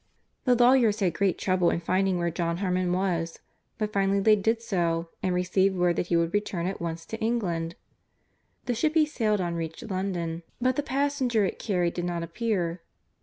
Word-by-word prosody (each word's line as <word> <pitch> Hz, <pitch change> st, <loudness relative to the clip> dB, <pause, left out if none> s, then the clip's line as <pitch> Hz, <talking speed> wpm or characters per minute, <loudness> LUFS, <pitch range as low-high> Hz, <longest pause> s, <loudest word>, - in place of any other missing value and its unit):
The 250 Hz, -2 st, +5 dB
lawyers 240 Hz, -3 st, +4 dB
had 185 Hz, -5 st, +1 dB
great 195 Hz, 0 st, +1 dB
trouble 185 Hz, -2 st, +2 dB
in -, -, 0 dB
finding 185 Hz, +2 st, +1 dB
where 170 Hz, -1 st, 0 dB
John 170 Hz, 0 st, -1 dB
Harmon 180 Hz, -1 st, 0 dB
was, 175 Hz, -3 st, -1 dB, 0.4 s
but 215 Hz, -1 st, -2 dB
finally 195 Hz, 0 st, +2 dB
they 215 Hz, +2 st, +5 dB
did 220 Hz, +3 st, +1 dB
so, 170 Hz, -6 st, -1 dB
and 185 Hz, -1 st, 0 dB
received 190 Hz, +2 st, +2 dB
word 175 Hz, -1 st, +2 dB
that 175 Hz, -, -1 dB
he 175 Hz, -, +1 dB
would 170 Hz, 0 st, 0 dB
return 205 Hz, -4 st, -1 dB
at 190 Hz, 0 st, -3 dB
once 165 Hz, -1 st, -4 dB
to 225 Hz, -, -6 dB
England. 180 Hz, -8 st, -1 dB, 0.9 s
The 245 Hz, -, 0 dB
ship 305 Hz, +7 st, 0 dB
he 315 Hz, -1 st, +5 dB
sailed 220 Hz, -9 st, 0 dB
on 175 Hz, -1 st, -2 dB
reached 165 Hz, +6 st, -5 dB
London, 175 Hz, -3 st, -2 dB, 0.2 s
but 255 Hz, +1 st, +2 dB
the 290 Hz, -, +1 dB
passenger 265 Hz, -5 st, +1 dB
it -, -, -4 dB
carried 180 Hz, -5 st, 0 dB
did 175 Hz, -, -3 dB
not 170 Hz, -1 st, -2 dB
appear. 175 Hz, -2 st, -2 dB
185 Hz, 190 wpm, -27 LUFS, 170-220 Hz, 0.9 s, The